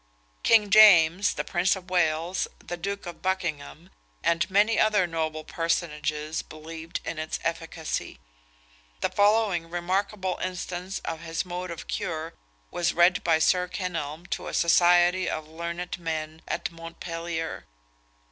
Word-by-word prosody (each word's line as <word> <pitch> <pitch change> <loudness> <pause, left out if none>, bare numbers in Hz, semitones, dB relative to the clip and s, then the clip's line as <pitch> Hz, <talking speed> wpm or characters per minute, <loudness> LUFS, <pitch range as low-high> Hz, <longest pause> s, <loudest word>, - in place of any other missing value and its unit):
King 210 -3 +4
James, 190 -3 +7
the - - -2
Prince 180 +1 +1
of 185 -1 -11
Wales, 170 0 +1
the 175 - -6
Duke 200 +4 -4
of 175 -1 -8
Buchingham, 170 - -3 0.3
and 170 +3 +2
many 210 +3 +3
other 210 -3 +4
noble 160 -2 -3
personages, 155 -2 -2
believed 160 +2 -7
in 160 - -4
its 155 0 -3
efficacy. 165 -1 -3 0.8
The - - +1
following 205 -5 +2
remarkable 185 +2 -1
instance 185 0 -4
of 165 -1 -3
his 165 +1 -3
mode 180 0 -5
of 170 - -7
cure 160 0 -3 0.4
was 175 -1 0
read 180 +3 +4
by 165 -2 +4
Sir 180 +3 +2
Kenelm 170 -3 -4
to - - -3
a - - -4
society 175 +2 +4
of 155 -1 -4
learned 170 +2 -5
men 160 -1 -4
at - - -2
Montpellier. 165 0 -5
170 Hz, 135 wpm, -26 LUFS, 160-185 Hz, 0.8 s, James